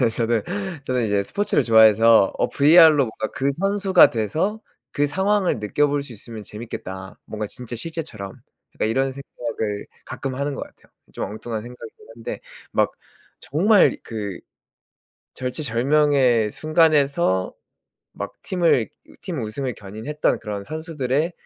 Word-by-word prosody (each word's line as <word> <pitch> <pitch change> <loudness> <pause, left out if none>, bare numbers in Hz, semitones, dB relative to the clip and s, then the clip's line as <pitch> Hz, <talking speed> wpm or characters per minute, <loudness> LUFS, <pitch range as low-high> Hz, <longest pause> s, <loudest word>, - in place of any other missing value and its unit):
네. 125 - +4
저는 115 -1 0 0.4
저는 125 -2 0
이제 100 -2 +1
스포츠를 200 - 0
좋아해서 110 -2 +6
'어 - - +1
VR로 155 +2 +7
뭔가 110 -1 -4
그 135 +1 0
선수가 195 -2 +5
돼서 160 - -1 0.3
그 145 - +1
상황을 190 - +1
느껴볼 145 +7 0
수 135 -4 -11
있으면 110 0 -9
재밌겠다. 95 -4 -8
뭔가 110 -1 -4
진짜 120 +2 -6
실제처럼.' 120 - -5 0.4
약간 - - -1
이런 135 +3 0
생각을 115 -6 -5 0.2
가끔 135 -1 -5
하는 140 +2 -2
것 - - -6
같아요. - - -14 0.2
좀 - - -4
엉뚱한 110 +2 -5
생각이기는 120 -1 -12
한데 115 0 -6 0.3
막 - - +1 0.5
정말 195 - +3
그 105 -5 -5 1.0
절체절명의 130 -2 +2
순간에서 150 - +2 0.6
막 - - -6
팀을 170 - +2 0.3
팀 170 -7 -4
우승을 120 +3 -4
견인했던 110 +10 -2
그런 105 -2 -5
선수들의 155 - -2
125 Hz, 295 characters per minute, -22 LUFS, 110-155 Hz, 1.0 s, VR로